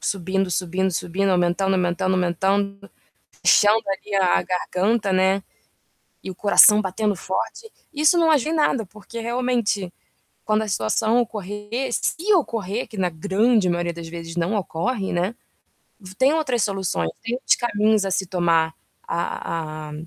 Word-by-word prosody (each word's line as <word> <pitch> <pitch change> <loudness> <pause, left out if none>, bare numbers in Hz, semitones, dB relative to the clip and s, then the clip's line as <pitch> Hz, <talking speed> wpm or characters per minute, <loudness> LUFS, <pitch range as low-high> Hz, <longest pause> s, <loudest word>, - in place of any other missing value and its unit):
subindo, 190 0 -1
subindo, 185 +1 -1
subindo, 185 +3 -1
aumentando, 180 +2 +1
aumentando, 185 +1 0
aumentando, 200 +3 -1 0.5
enchendo 215 +2 +5
ali 195 +1 -4
a 185 -2 +3
a - - -1
garganta, 190 +3 -1
né. 190 +1 +2 0.8
E - - -6
o 185 - -7
coração 210 +2 +6
batendo 205 +2 -1
forte. 190 - -4 0.2
Isso 305 +3 +3
não 330 -1 +3
ajuda 305 +1 +2
em - - 0
nada, 270 -8 +1
porque, 215 +4 -10
realmente, 235 -5 -1 0.5
quando 215 0 +1
a - - -6
situação 210 - +1
ocorrer, 210 +3 -4
se 390 +6 0
ocorrer, 225 - -1
que 215 - -12
na 185 -2 +1
grande 200 +5 +1
maioria 175 0 -1
das 170 0 -8
vezes 165 0 -8
não 175 +5 -1
ocorre, 200 +3 -2
né, 180 +6 -1 0.8
tem 265 +3 +4
outras 265 -8 0
soluções, 190 - -1
tem 235 +2 -2
outros 255 - +2
caminhos 215 -2 +1
a 195 - -2
se 190 - 0
tomar, 170 -3 +1 0.3
a 155 -2 -4
a - - -8
195 Hz, 150 wpm, -22 LUFS, 180-220 Hz, 0.8 s, coração